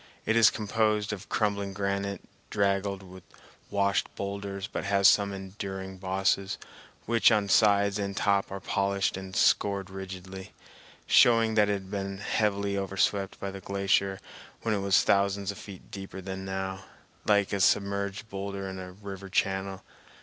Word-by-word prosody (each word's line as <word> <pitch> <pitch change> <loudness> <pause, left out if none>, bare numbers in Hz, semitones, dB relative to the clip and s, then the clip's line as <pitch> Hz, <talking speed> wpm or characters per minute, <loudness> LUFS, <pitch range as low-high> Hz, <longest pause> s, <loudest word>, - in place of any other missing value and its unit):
It 115 - +2
is 115 -2 +7
composed 105 0 0
of 100 - -8
crumbling 100 -2 0
granite 100 0 -2 0.3
draggled 100 -1 0
with 95 0 -12 0.5
washed 100 -1 +1
boulders, 100 -1 -4
but - - -4
has 100 -1 +4
some 100 -1 +4
enduring 95 -1 -6
bosses 95 +1 0 0.5
which 115 +1 +4
on 105 -2 +2
sides 100 0 +4
and 100 0 -3
top 100 -1 +1
are 95 - -4
polished 100 0 0
and 95 0 -7
scored 100 -1 +2
rigidly, 95 0 -8 0.5
showing 115 -2 +5
that 105 -1 +4
it - - +2
had 95 -1 -5
been 100 -1 -3
heavily 100 -1 0
overswept 95 0 0
by 100 - -4
the 95 0 -8
glacier 100 0 +1 0.4
when 115 - +1
it 105 - 0
was 100 -1 +3
thousands 100 0 +2
of 100 - -10
feet 95 -3 -11
deeper 95 -1 -7
than 95 0 -6
now, 95 0 -4 0.4
like 100 -1 +3
a 100 - 0
submerged 100 +2 +1
boulder 100 -1 -5
in 95 0 -6
a 90 0 -8
river 100 0 -8
channel. 95 0 -1
100 Hz, 155 wpm, -28 LUFS, 95-100 Hz, 0.5 s, is